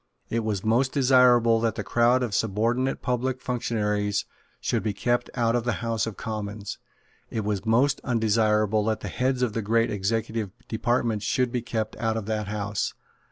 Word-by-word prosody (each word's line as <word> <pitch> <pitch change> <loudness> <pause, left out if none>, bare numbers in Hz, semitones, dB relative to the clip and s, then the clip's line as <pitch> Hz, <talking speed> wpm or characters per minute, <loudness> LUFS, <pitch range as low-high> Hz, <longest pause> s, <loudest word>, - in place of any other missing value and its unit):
It 115 - +1
was 105 -3 -2
most 125 +4 +2
desirable 125 -4 +5
that 115 -1 0
the 105 - -3
crowd 120 +5 +3
of 115 -5 -3
subordinate 115 +6 0
public 125 +1 -1
functionaries 105 -5 -1 0.3
should - - 0
be 110 -2 -1
kept 120 +3 0
out 115 -1 +2
of 120 - +1
the 120 -1 0
House 115 -2 0
of 110 - -6
Commons. 105 -2 -5 0.5
It 110 -2 -3
was 105 0 -2
most 130 +6 +3
undesirable 110 -3 +2
that 110 -1 -1
the - - -4
heads 130 0 0
of 115 -4 0
the 115 - -1
great 115 +2 +2
executive 110 +1 -1 0.2
departments 115 -2 0
should 125 +3 +1
be 125 -1 -1
kept 110 -2 -3
out 110 -1 0
of 110 - -4
that 105 -1 -2
House. 105 -1 -2
115 Hz, 175 wpm, -26 LUFS, 105-120 Hz, 0.5 s, desirable